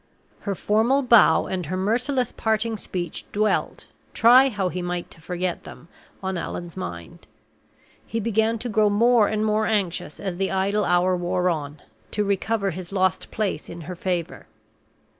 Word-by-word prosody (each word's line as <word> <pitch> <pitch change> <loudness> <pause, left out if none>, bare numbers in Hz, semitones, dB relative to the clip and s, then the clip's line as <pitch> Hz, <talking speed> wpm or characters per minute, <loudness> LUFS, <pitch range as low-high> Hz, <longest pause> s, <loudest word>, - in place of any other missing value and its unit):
Her 200 - 0
formal 230 +9 +2
bow 235 -9 +5
and 180 -4 -3
her 185 +3 -2
merciless 245 +6 0
parting 220 +1 -1
speech 180 -5 -5
dwelt, 215 +1 0 0.3
try 250 +4 +7
how 195 -6 -1
he 180 +1 -4
might 175 0 -4
to 165 - -12
forget 180 +1 -3
them, 170 - -12 0.3
on 190 -2 -2
Allan's 175 0 -6
mind; 85 -2 -8 0.8
he 230 - -2
began 225 +1 +1
to 235 - -5
grow 215 -2 +3
more 225 +1 +4
and 215 0 -1
more 215 0 +1
anxious 195 -8 -1
as 190 -3 -4
the 195 0 0
idle 200 +2 +1
hour 180 +1 +3
wore 180 0 0
on, 150 -2 -5 0.3
to 210 - -1
recover 200 0 0
his 180 +1 -8
lost 185 -3 0
place 215 -3 -3
in 170 0 -8
her 180 +3 -7
favor. 175 -2 -3
195 Hz, 160 wpm, -24 LUFS, 175-220 Hz, 0.8 s, try